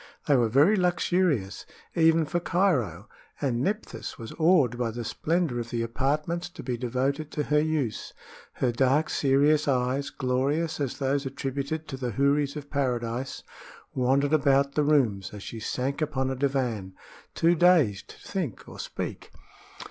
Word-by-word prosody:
They 145 - +4
were 120 -3 +3
very 145 - +5
luxurious, 175 - +1 0.3
even 165 -1 +4
for 175 +3 -1
Cairo, 135 - 0 0.3
and 125 -4 0
Nephthys 210 - -3
was 115 -1 -8
awed 155 -8 +4
by 120 -1 -1
the 120 +1 -5
splendor 160 +1 -1
of 120 0 -5
the 115 -1 -1
apartments 150 +8 -1
to 175 - -10
be 125 -1 -2
devoted 130 +5 -1
to 150 - -1
her 150 +1 +2
use. 150 -7 -1 0.4
Her 125 - 0
dark, 135 +5 +2
serious 145 +2 +3
eyes, 130 +1 0
glorious 140 +6 -1
as 140 -4 -2
those 135 0 0
attributed 140 +3 -4
to 135 - -6
the 125 -3 -3
houris 140 +3 +1
of 145 -1 -8
Paradise, 125 -2 -2 0.5
wandered 135 +3 +2
about 140 -2 +3
the 150 - +2
rooms 115 -11 +1
as 105 - -8
she 115 - -7
sank 130 +6 -2
upon 135 -3 -1
a - - -2
divan, 125 -8 -1 0.4
too 170 +1 +4
dazed 165 - +3
to - - -12
think 175 - -4
or - - -11
speak. - - -5
140 Hz, 155 wpm, -27 LUFS, 125-155 Hz, 0.5 s, very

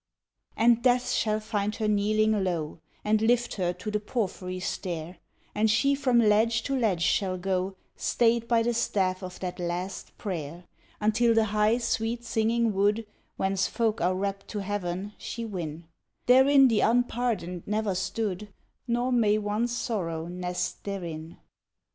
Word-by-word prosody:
And 235 +1 +4
Death 250 0 +2
shall 215 -1 +1
find 210 -1 -2
her 220 - -1
kneeling 210 0 +2
low, 170 -4 -2 0.3
And 215 0 +2
lift 240 +2 +2
her 180 -2 +1
to 215 - -6
the 210 - 0
porphyry 190 -4 -3
stair, 175 -2 -4 0.3
And 220 +1 +2
she 275 +6 +3
from 270 -3 +2
ledge 225 0 +3
to 275 - -1
ledge 210 -9 +1
shall 185 0 +1
go, 190 +1 -1 0.2
Stayed 235 -1 +1
by 230 -1 +3
the 240 +1 +1
staff 190 -5 0
of 185 -1 -8
that 180 -1 -4
last 180 +2 -4
prayer, 170 -3 -5 0.4
Until 225 +2 +3
the 225 - +5
high, 210 +2 +3
sweet 235 0 -1
singing 230 0 +1
wood 205 +3 +1 0.3
Whence 190 -1 +1
folk 225 -2 0
are 180 +2 +2
rapt 195 +1 -3
to 205 -2 -4
heaven, 195 0 -3
she 230 -1 -5
win; 170 -6 -5 0.4
Therein 265 +2 +6
the 225 -4 +2
unpardoned 235 -6 0
never 210 -1 0
stood, 200 +1 -3 0.4
Nor 240 +2 0
may 215 -4 +3
one 210 +2 0
Sorrow 195 -10 -3
nest 180 +1 -4
therein. 170 -5 -6
210 Hz, 150 wpm, -27 LUFS, 185-230 Hz, 0.4 s, Therein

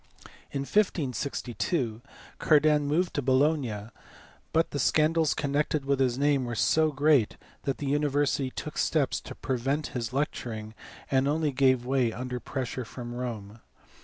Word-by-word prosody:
In 140 - -2
1562 135 - -1 0.4
Cardan 150 -1 +4
moved 170 +5 +1
to 145 - 0
Bologna, 130 -5 +1 0.6
but 165 +1 +2
the 145 - -3
scandals 155 +3 +3
connected 145 0 0
with 140 -1 +1
his 125 -2 +2
name 140 -2 +2
were 120 -1 -4
so 155 +7 +3
great 140 -5 +3 0.3
that 135 - -1
the 145 - -5
university 145 -1 +1
took - - -6
steps - - +1
to - - -9
prevent 135 +4 -1
his 120 -4 -3
lecturing, 115 -6 -3 0.4
and 135 0 +3
only 150 0 +1
gave 130 -2 +3
way 130 -3 +1
under 125 +1 -4
pressure 130 -1 -4
from 120 +1 -8
Rome. 115 -4 -5
135 Hz, 140 wpm, -28 LUFS, 125-150 Hz, 0.6 s, Cardan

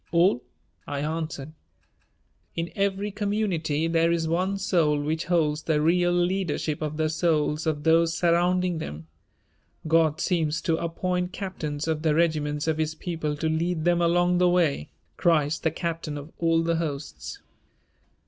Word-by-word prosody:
"All," 170 -6 +3 0.5
I 140 -1 -3
answered. 155 -1 -4 1.0
"In 165 +1 -3
every 200 0 0
community 195 -7 -1
there 165 0 +2
is 165 -1 0
one 185 +4 0
soul 165 -6 +2
which 155 +3 -2
holds 155 -4 +1
the 155 -1 +1
real 175 +3 +3
leadership 175 -4 0
of 155 -1 -3
the 155 0 +1
souls 155 -1 0
of 150 -2 -1
those 165 0 +3
surrounding 175 0 +2
them. 80 - -6 0.8
God 160 -1 +3
seems 165 -3 0
to 165 - +1
appoint 180 +2 -2
captains 155 -6 -4
of 160 -1 0
the 155 -2 +2
regiments 150 -3 +1
of 160 -1 0
His 155 0 -1
people 160 -3 -3
to 155 +2 -2
lead 160 +1 -1
them 175 0 +3
along 175 +1 +3
the 180 0 +4
way, 165 - +1 0.3
Christ 155 -3 +2
the 160 - +2
captain 165 -2 -4
of 145 +3 -9
all 165 -1 +2
the 165 0 +1
hosts. 140 - -5
165 Hz, 150 wpm, -26 LUFS, 155-175 Hz, 1.0 s, the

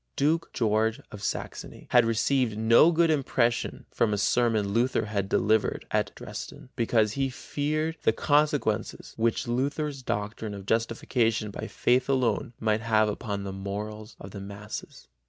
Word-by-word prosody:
Duke 160 +4 +1
George 110 -1 +1
of 105 - -9
Saxony - - -5
had 120 -2 +6
received 115 0 +1
no 115 +9 +6
good 165 -1 +3
impression 125 -5 0
from 105 -3 +1
a - - -3
sermon 110 -2 +2
Luther 115 +1 +1
had 100 -2 -2
delivered 110 +2 +1
at - - +1
Dresden, - - -8
because 115 -3 +2
he 135 +3 -1
feared 155 +4 -2
the - - +4
consequences 145 -4 0
which 115 +1 0
Luther's 140 +3 -1
doctrine 105 -2 -3
of 100 -1 -9
justification 115 0 0
by - - -6
faith 125 +1 +1
alone 125 -4 +1
might 110 -1 +1
have 110 -2 +3
upon 100 -1 -4
the 100 -1 -5
morals 105 +3 -6
of 95 - -9
the 100 - -7
masses. 100 - -8
115 Hz, 150 wpm, -27 LUFS, 105-130 Hz, -, had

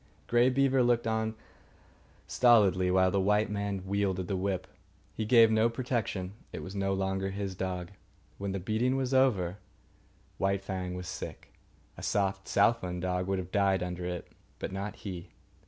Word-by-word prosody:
Grey 120 +1 +4
Beaver 135 0 +3
looked 120 -1 +2
on 110 0 -1 0.9
stolidly 100 -7 +4
while 95 0 +4
the 100 - +2
white 105 +2 +2
man 100 -2 -3
wielded 95 -2 -1
the 95 - -1
whip. 95 0 -1 0.5
He 110 - -3
gave 115 -1 +6
no 110 +1 +4
protection. 115 -6 -2 0.2
It - - -6
was 95 - -7
no 95 0 0
longer 95 0 -1
his 100 0 -4
dog. 90 -1 -4 0.5
When 100 0 -2
the 95 - -2
beating 110 +7 0
was 135 -1 -1
over 100 -9 +2 0.8
White 95 0 +1
Fang 95 -2 -4
was 90 0 -6
sick. 90 - -7 0.4
A - - -8
soft 95 -1 0
southland 90 -6 +2
dog 90 0 -1
would 95 0 0
have 95 0 -5
died 95 -2 +2
under 90 0 -4
it, 90 -1 -4 0.3
but - - -5
not 100 +1 -4
he. 95 -4 -7
95 Hz, 165 wpm, -30 LUFS, 95-110 Hz, 0.9 s, gave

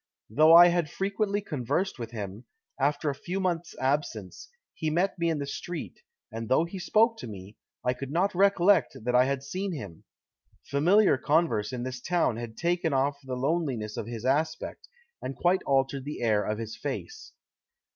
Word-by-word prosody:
"Though 155 +7 +7
I 175 +1 +10
had 170 -3 0
frequently 200 +2 -1
conversed 150 - -2
with 115 -2 -5
him, 105 0 -7 0.3
after 145 +2 +1
a - - -4
few 175 +7 -4
months' 175 -3 -2
absence, 130 - -2 0.2
he 155 - -2
met 175 +4 0
me 170 0 +1
in 160 - 0
the 140 - -3
street, 170 +4 -6 0.3
and 115 0 -6
though 145 +6 +3
he 185 +3 -7
spoke 225 +5 +3
to - - -7
me, 100 -1 -10 0.3
I 125 - +2
could 135 +1 -7
not 180 +7 +1
recollect 195 -5 +3
that 125 +1 -1
I 125 +1 +5
had 135 0 -2
seen 185 +7 -3
him. 100 - -8 0.6
Familiar 175 +2 +4
converse 145 -10 +1
in 125 -1 -4
this 130 -1 -5
town 170 -9 +1
had 115 -1 -7
taken 170 -2 0
off 140 +1 +1
the 130 -1 -4
loneliness 130 -6 -1
of 105 - -5
his 115 0 -6
aspect, 155 +4 -1 0.3
and 135 - -5
quite 175 +8 +2
altered 135 0 +1
the 145 -2 -6
air 105 -3 +2
of 105 - -2
his 110 -1 -6
face." 430 - -6
145 Hz, 180 wpm, -28 LUFS, 125-175 Hz, 0.6 s, I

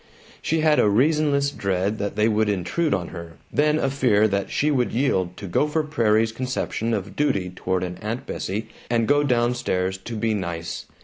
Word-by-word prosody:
She 160 0 0
had 155 -1 +4
a 105 - +4
reasonless 140 +4 +2
dread 100 -1 -1
that 100 0 -3
they 105 +1 +3
would 110 -1 +2
intrude 105 - 0
on 90 -3 -1
her, 85 -2 -8 0.2
then 150 +1 +3
a 140 - +1
fear 120 -6 +3
that 100 0 -1
she 150 +1 +1
would 125 -4 +1
yield 95 -9 0
to 100 - -7
Gopher 150 - +1
Prairie's 115 -7 +2
conception 115 -1 -2
of 100 -1 -5
duty 100 -12 0
toward 90 0 -2
an 90 0 -5
Aunt 115 +4 -4
Bessie 110 +4 -4 0.2
and 115 -2 +1
go 145 +3 +4
down 120 -3 +2
stairs 95 -6 -1
to 115 +5 -7
be 110 0 0
"nice." 85 -4 -4
110 Hz, 190 wpm, -23 LUFS, 95-140 Hz, 0.2 s, had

